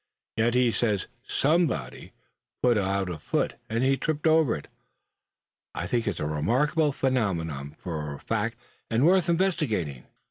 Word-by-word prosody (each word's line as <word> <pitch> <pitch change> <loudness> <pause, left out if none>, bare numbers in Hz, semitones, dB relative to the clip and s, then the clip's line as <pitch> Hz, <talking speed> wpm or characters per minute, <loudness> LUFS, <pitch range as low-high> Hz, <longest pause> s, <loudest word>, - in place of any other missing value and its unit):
Yet 115 +2 +2
he 125 -1 +4
says 105 -5 0 0.2
somebody 140 - 0 0.5
put 125 -1 +5
out 100 -1 0
a 85 -3 -5
foot, - - -1 0.2
and 115 +3 0
he 135 +1 +3
tripped 150 +1 -2
over 160 -5 +4
it. 75 - -8 1.1
I 85 - -3
think 115 +4 -1
it 105 - -1
a - - -1
remarkable 130 - +1
phenomenon, 85 - -1
for 75 -4 -4
a - - -11
fact, 115 +1 -2 0.3
and 115 +5 +3
worth 180 0 +4
investigating." 145 - 0
115 Hz, 145 wpm, -27 LUFS, 85-145 Hz, 1.1 s, put